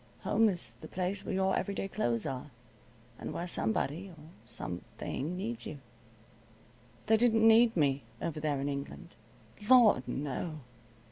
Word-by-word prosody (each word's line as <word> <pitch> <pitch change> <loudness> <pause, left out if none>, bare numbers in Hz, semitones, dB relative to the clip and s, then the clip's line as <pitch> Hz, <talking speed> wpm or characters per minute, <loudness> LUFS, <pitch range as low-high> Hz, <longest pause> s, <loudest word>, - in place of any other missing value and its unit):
Home 225 -1 +3
is 180 -3 -2
the - - -8
place 190 +2 -3
where 195 - -3
your 190 0 +2
everyday 200 -1 -2
clothes 120 - -1
are, 135 0 -4 0.7
and - - -5
where 175 - -3
somebody, 165 - 0
or 175 - -13 0.3
something 135 - -3
needs 225 +5 -4
you. 155 - -6 1.3
They 220 +1 +4
didn't 225 -1 +4
need 225 -1 +6
me 140 -3 +2 0.2
over 160 -2 -3
there 150 -2 -1
in 140 - -2
England. 140 +5 -5 0.6
Lord 230 - +6
no! 145 +4 -4
175 Hz, 140 wpm, -31 LUFS, 140-215 Hz, 1.3 s, need